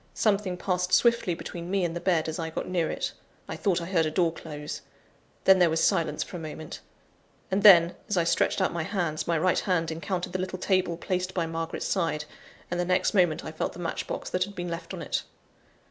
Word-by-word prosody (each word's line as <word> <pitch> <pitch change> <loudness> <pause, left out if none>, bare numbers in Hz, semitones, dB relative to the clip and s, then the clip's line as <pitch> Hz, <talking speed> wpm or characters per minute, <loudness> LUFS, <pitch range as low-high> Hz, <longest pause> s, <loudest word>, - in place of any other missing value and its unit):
Something 200 -4 +1
passed 180 0 -1
swiftly 235 -3 +4
between 170 +1 -7
me 195 -1 +1
and 165 0 -3
the - - -2
bed, 170 -4 +1
as 160 +1 -4
I 165 -1 -2
got 160 - -4
near 175 -3 0
it. - - -3 0.3
I - - -4
thought 190 -4 +1
I 170 - -5
heard 170 -3 +2
a - - 0
door 165 +1 +2
close. 150 -3 -7 0.6
Then 190 -1 +6
there 175 -2 +5
was 160 0 +1
silence 165 -6 +2
for 180 - -8
a - - -6
moment; 155 -1 -7 0.7
and 195 +2 +2
then, 175 -4 +8 0.2
as 205 - 0
I 170 - +4
stretched 170 +1 +1
out - - +1
my 170 - -1
hands, 160 -3 -2
my 170 -1 +2
right 185 +4 +2
hand 165 -5 0
encountered 175 +3 -3
the 185 - -1
little 185 0 -3
table 185 -2 +1
placed 185 +1 -2
by 170 -3 +1
Margaret's 165 0 -4
side, 165 -5 0 0.5
and 175 - -1
the - - +2
next 180 +3 +1
moment 175 -6 +2
I 155 - -5
felt 155 - -3
the - - -11
match 175 -2 -3
box - - -5
that 180 0 +1
had 200 0 -12
been 175 -2 -4
left 170 0 -5
on - - -5
it. - - -1
175 Hz, 230 wpm, -27 LUFS, 165-185 Hz, 0.7 s, then